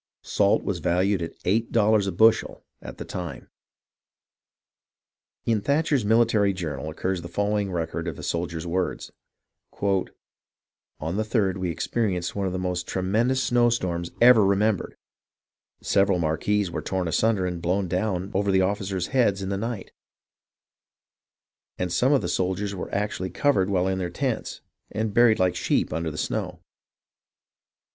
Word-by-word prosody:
Salt - - +2
was - - -2
valued 95 +2 +1
at 85 - -6
eigJit 110 +5 +1
dollars 110 -2 +3
a - - 0
btishel 110 +2 +3 0.2
at - - -9
the - - -6
time. 90 -2 -7 1.9
In 110 -3 +1
Thatcher's 140 0 +1
Military 110 -2 +3
Journal 80 -5 -4
occurs 90 +3 -2
the 85 - -7
following 100 +2 -1
record 85 -1 -3
of 80 - -4
a - - -9
soldier's 85 -1 -3
words: 90 +2 -2 0.2
— - - -59
" - - -30 1.2
On 80 +5 -3
the - - +1
3d 105 -4 0
we 90 -1 -2
experienced 90 -1 -2
one 100 -1 -1
of - - -2
the 95 - -3
most 90 -1 -2
tremen 95 +6 0
dous 130 +1 +1
snow 120 -1 +3
storms 85 -7 -2
ever 120 -2 +7
remembered.... 100 0 +1 0.9
Several 100 -1 +3
mar 80 -2 0
quees 105 -2 0
were 80 - -3
torn 95 +2 -2
asunder 100 +3 +1
and 90 -2 -3
blown 95 +3 0
down 95 +1 -2
over 100 +1 +1
the 95 0 +4
officers' 95 -2 -1
heads 105 -7 +2
in 95 - -3
the 100 - -1
night, 110 0 -4 1.9
and 90 -1 -2
some 125 +9 +3
of 140 - +3
the - - -1
soldiers 95 +2 -1
were 95 - -6
actually 100 -2 -2
covered 95 -1 +1
while 95 -2 +1
in 95 0 -1
their 90 -2 -2
tents, 125 +5 -3 0.3
and 110 0 -2
buried 120 -1 +5
like 90 -1 +1
sheep - - 0
under 80 +1 -2
the 75 - -8
snow. - - -3
95 Hz, 160 wpm, -25 LUFS, 90-110 Hz, 1.9 s, ever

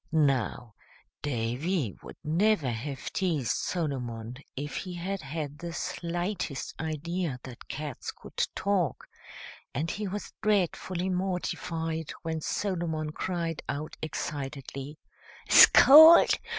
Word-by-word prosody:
Now, 130 -7 +1 0.5
Davy 130 - -1
would - - -11
never 165 - +2
have 135 +4 -5
teased 160 - 0
Solomon 125 -8 -3 0.2
if 145 +2 -4
he 180 -2 -5
had 190 +3 -3
had 150 0 -5
the 170 0 -6
slightest 175 -3 -3
idea 160 -2 -3
that 130 -2 -11
cats 150 -4 -5
could - - -3
talk, 195 -7 0 0.7
and 155 +6 -1
he 210 0 -3
was 205 +2 -6
dreadfully 190 -3 0
mortified 170 -3 -2
when 160 -1 -3
Solomon 165 -5 -2
cried 170 -1 -3
out 145 +2 -4
excitedly, 140 -1 -5 0.5
"Scold! 315 +4 +9
160 Hz, 105 wpm, -28 LUFS, 140-180 Hz, 0.7 s, Scold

